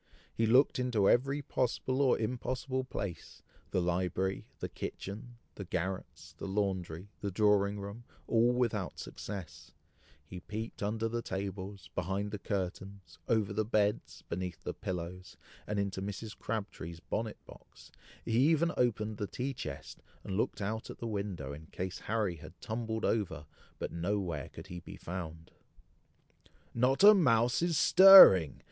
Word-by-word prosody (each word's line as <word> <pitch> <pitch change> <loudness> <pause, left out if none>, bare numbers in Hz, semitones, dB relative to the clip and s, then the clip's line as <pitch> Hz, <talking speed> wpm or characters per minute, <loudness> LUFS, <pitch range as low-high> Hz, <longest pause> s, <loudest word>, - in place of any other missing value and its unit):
He 115 - +1
looked 130 +4 +4
into 120 -6 +2
every 135 +4 +2
possible 130 +1 -1
or 135 -3 +4
impossible 125 +3 -2
place 100 -9 -6 0.3
the - - 0
library, 90 +2 -1
the - - -4
kitchen, 115 +5 -7 0.2
the 100 - -7
garrets, 85 -2 -4
the - - -5
laundry, 95 -2 -2
the 100 - -3
drawing 100 0 +2
room, 100 +4 -8 0.2
all 115 +1 +3
without 115 -6 -1
success, 95 -7 -8 0.5
he 90 +5 -8
peeped 110 +5 -6
under 110 +2 -1
the 120 +1 -2
tables, 95 -2 -6
behind 95 +3 -2
the 105 - -5
curtains, 95 -2 -5
over 110 -3 +1
the 110 +2 +1
beds, 105 -1 0
beneath 90 0 -5
the - - -3
pillows, 90 0 -6 0.3
and 105 - -2
into 100 -1 -2
Mrs. 105 +2 -5
Crabtree's 100 -6 -5
bonnet 110 +4 -3
box, - - -16 0.3
he - - -3 0.2
even 165 +1 +3
opened 110 -3 0
the 105 -2 -3
tea 130 +6 -3
chest, 70 - -7 0.2
and 95 - -4
looked 105 - -1
out 110 +3 -3
at - - -8
the - - -6
window, 100 -10 -4
in 80 +2 -10
case 95 +1 -5
Harry 105 -6 -1
had - - -13
tumbled 110 0 -3
over, 100 -9 -1 0.3
but - - -4
nowhere 85 -3 -2
could - - -10
he 90 -2 -7
be 85 - -11
found. 80 -2 -7 1.2
"Not 130 +8 +2
a 210 +1 +11
mouse 125 - +3
is 170 -2 +1
stirring!" 185 - +9
100 Hz, 150 wpm, -32 LUFS, 95-115 Hz, 1.2 s, a